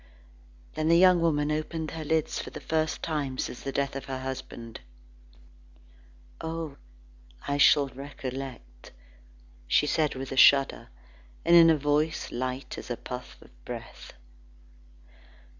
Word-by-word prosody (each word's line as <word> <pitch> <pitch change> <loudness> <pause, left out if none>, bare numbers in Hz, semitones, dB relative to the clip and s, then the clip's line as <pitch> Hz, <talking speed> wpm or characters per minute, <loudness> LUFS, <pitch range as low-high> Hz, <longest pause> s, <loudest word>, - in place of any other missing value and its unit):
Then 155 0 -1
the 170 - +6
young 180 -1 +6
woman 150 -3 +1
opened 155 +1 -3
her 160 -1 -5
lips 160 0 0
for - - -5
the - - -8
first 160 0 -1
time 145 -5 -2
since 125 - -4
the 135 - -4
death 140 0 -1
of 135 -1 -5
her 135 -1 -4
husband. 125 -3 -7 1.6
"Oh! 160 -3 -5 0.7
I 145 0 -1
shall 145 0 +6
recollect," 130 - -8 0.8
said 150 0 +2
she - - -9
with 135 0 -6
a 135 - -4
shudder, 135 0 +5 0.6
and 170 +1 +6
in 165 -1 +9
a 160 - +4
voice 150 +2 0
light 130 +1 -4
as - - -10
a 120 - -3
puff 125 0 -8
of - - -19
breath. - - -9
145 Hz, 140 wpm, -28 LUFS, 130-160 Hz, 1.6 s, in